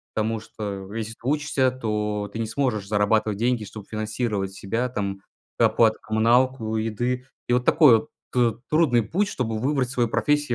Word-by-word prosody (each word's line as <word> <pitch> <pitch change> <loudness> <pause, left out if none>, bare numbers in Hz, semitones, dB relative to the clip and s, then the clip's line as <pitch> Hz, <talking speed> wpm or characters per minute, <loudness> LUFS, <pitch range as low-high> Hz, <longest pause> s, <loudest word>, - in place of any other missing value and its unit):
Потому 110 +1 0
что, 100 -3 -7
если 115 0 -3
ты - - -22
учишься, 145 -2 +2
то 105 -4 -2
ты 115 - -5
не 115 - -1
сможешь 115 -4 -1
зарабатывать 105 0 +1
деньги, 120 -1 0
чтобы 105 0 -10
финансировать 110 -2 -2
себя, 115 +6 -2
там 100 -4 -3 0.4
оплату 110 -1 +4
коммуналку, 115 +1 +2
еды. 120 +4 -2 0.2
И 120 - +1
вот 125 0 +1
такой 140 -4 +5 0.2
ты 120 -2 +2 0.2
трудный 150 -7 +3
путь, 195 - 0
чтобы 115 - -2
выбрать 130 0 0
свою 120 -3 +1
профессию 145 +1 +1
115 Hz, 160 wpm, -24 LUFS, 105-125 Hz, 0.4 s, такой